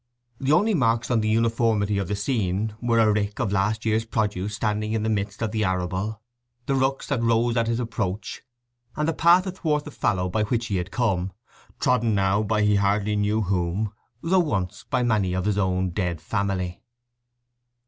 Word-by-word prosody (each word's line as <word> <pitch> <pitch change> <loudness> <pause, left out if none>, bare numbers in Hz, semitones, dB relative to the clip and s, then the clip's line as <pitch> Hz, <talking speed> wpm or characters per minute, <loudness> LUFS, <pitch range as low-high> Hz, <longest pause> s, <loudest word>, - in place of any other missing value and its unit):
The 135 +1 0
only 210 +8 +4
marks 115 - +1
on 115 -2 +3
the 110 - 0
uniformity 110 -2 +1
of 95 - -2
the 105 - -1
scene 105 -1 -1
were 120 -1 +1
a 110 -2 +4
rick 105 -1 -1
of 120 -5 0
last 105 +3 0
year's 110 0 +2
produce 105 -3 -2
standing 110 0 -1
in 110 -1 0
the 110 - 0
midst 100 +1 -2
of 110 - -1
the 110 -1 0
arable, 95 +3 -2 0.4
the 140 - 0
rooks 135 0 0
that 140 -5 0
rose 115 0 +2
at 115 -1 +1
his 115 0 0
approach, 110 -4 -3 0.5
and 150 +1 -1
the 165 - +1
path 170 +4 +5
athwart 160 -6 -1
the 150 - -7
fallow 95 -8 0
by 100 +4 -1
which 115 +1 -1
he 100 -4 -1
had 90 0 -3
come, 95 -7 -1 0.5
trodden 115 -3 +2
now 100 +1 +2
by 105 0 +1
he 105 -1 +3
hardly 100 +1 +1
knew 105 +1 +1
whom, 95 +2 -1 0.3
though 185 +3 +3
once 100 - -2
by 130 -1 +1
many 105 -6 +1
of 95 0 -1
his 105 -1 +1
own 95 -1 0
dead 90 -3 -2
family. 90 +1 -2
110 Hz, 190 wpm, -24 LUFS, 100-115 Hz, 0.5 s, path